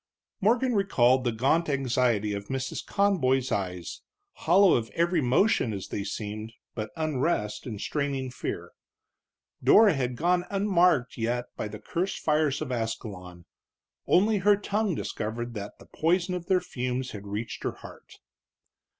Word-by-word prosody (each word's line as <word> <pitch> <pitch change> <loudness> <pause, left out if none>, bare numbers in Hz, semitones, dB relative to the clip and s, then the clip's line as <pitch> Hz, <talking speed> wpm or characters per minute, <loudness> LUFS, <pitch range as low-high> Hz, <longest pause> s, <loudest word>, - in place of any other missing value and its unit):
Morgan 240 +5 +2
recalled 130 - +3
the 120 - +1
gaunt 135 +9 +1
anxiety 125 -6 +1
of 100 0 -5
Mrs. 130 0 -3
Conboy's 135 -11 +1
eyes, 90 -3 -3 0.3
hollow 185 +3 +4
of 115 -2 0
every 170 +1 +2
emotion, 130 - +2
as 95 -2 -6
they 100 - -3
seemed, 105 +2 -5 0.2
but 110 -2 -4
unrest 145 -8 -1
and 110 -4 -5
straining 135 +3 -2
fear. - - -5 0.9
Dora 215 -3 +7
had 125 -3 -2
gone 175 +5 +1
unmarked 180 - +2
yet 120 +2 -2
by - - -3
the 105 0 -8
cursed 180 - -3
fires 150 -2 +1
of 135 - -6
Ascalon; 100 -7 -5 0.6
only 205 +3 +4
her 205 +2 +4
tongue 205 -2 -1
discovered 115 0 -4
that 100 -2 -7
the - - -16
poison 175 +3 0
of 175 -1 -5
their 185 -2 +3
fumes 125 0 -3
had 100 -1 -8
reached 105 +3 -5
her - - -1
heart. - - -13
130 Hz, 145 wpm, -27 LUFS, 110-175 Hz, 0.9 s, Dora